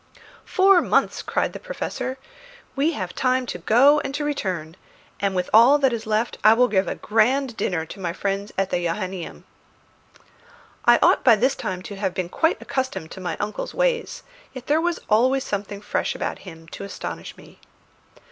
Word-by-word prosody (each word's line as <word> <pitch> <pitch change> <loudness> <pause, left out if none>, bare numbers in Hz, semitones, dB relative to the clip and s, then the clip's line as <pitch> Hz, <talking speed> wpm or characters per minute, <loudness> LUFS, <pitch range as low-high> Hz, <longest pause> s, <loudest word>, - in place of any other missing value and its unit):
"Four 385 -1 +5
months!" - - +1
cried - - -1
the - - -7
Professor. - - -5 0.6
"We 300 +4 +1
have 185 -8 -5
time 255 0 +1
to 180 - -5
go 260 - +5
and 275 -1 -4
to 295 - -2
return; 180 - -3 0.4
and 200 -1 -1
with 180 0 -1
what 265 +4 +6
is 225 -2 -5
left 220 +2 -1
I 215 +1 +8
will 250 +2 +4
give 195 -4 +1
a - - -2
grand 240 +4 +1
dinner 165 -6 -2
to 195 - -11
my 175 -3 -2
friends 200 +3 -3
at 195 0 0
the 175 - 0
Johannæum." 185 +1 -4 1.4
I - - +7
ought - - +4
by 235 -3 +7
this 255 +6 +2
time 185 -1 -5
to 200 - -8
have 195 -2 -2
been 180 -2 -3
quite 320 - +1
accustomed 195 -12 -4
to 190 - -9
my 180 - -3
uncle's 210 +1 -4
ways; - - -1 0.3
yet 255 -2 -9
there 305 +2 +2
was 345 0 -1
always 255 +5 +3
something 205 -3 -4
fresh 210 - -2
about - - -4
him 165 -1 -14
to - - -8
astonish 200 - -7
me. - - -17
215 Hz, 180 wpm, -23 LUFS, 190-270 Hz, 1.4 s, I